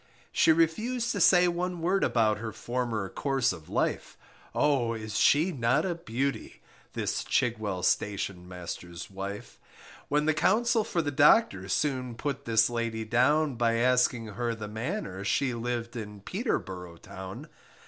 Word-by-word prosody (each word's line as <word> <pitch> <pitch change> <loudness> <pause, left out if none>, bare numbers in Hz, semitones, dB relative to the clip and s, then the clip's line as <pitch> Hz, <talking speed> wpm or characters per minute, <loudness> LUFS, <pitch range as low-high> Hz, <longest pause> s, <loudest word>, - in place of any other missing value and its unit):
She 165 - +4
refused 215 +10 +1
to 200 - -2
say 180 +1 +6
one 175 0 -2
word 185 +4 +1
about 110 -3 +2
Her 110 0 -4
former 120 -5 -3
course 135 +1 0
of 80 -4 -12
life; - - -1 0.4
Oh, 130 -6 +2
is 110 -2 -6
she 155 - +4
not 130 +2 +1
a 180 - 0
beauty! 140 -4 -4 0.3
This - - -2
Chigwell 110 -7 -1
Station 95 -2 -1
master's 90 0 -7
wife 100 +1 -7 0.5
When 150 +1 +1
the 155 - +3
Counsel 220 +9 +2
for 170 -4 -1
the 145 - -2
Docter, 135 - +4
Soon 130 +1 -1
put 140 +2 -4
this 110 -1 +4
lady 115 -2 -3
down, 130 +4 +2
By 115 -1 +2
asking 125 0 +2
her 115 +3 -3
the 110 -1 -6
manner 110 - -4
She 130 +5 +1
lived 120 0 -3
in 105 -3 -7
Peterborough 95 - -3
town. 95 +2 -9
120 Hz, 150 wpm, -28 LUFS, 105-150 Hz, 0.5 s, say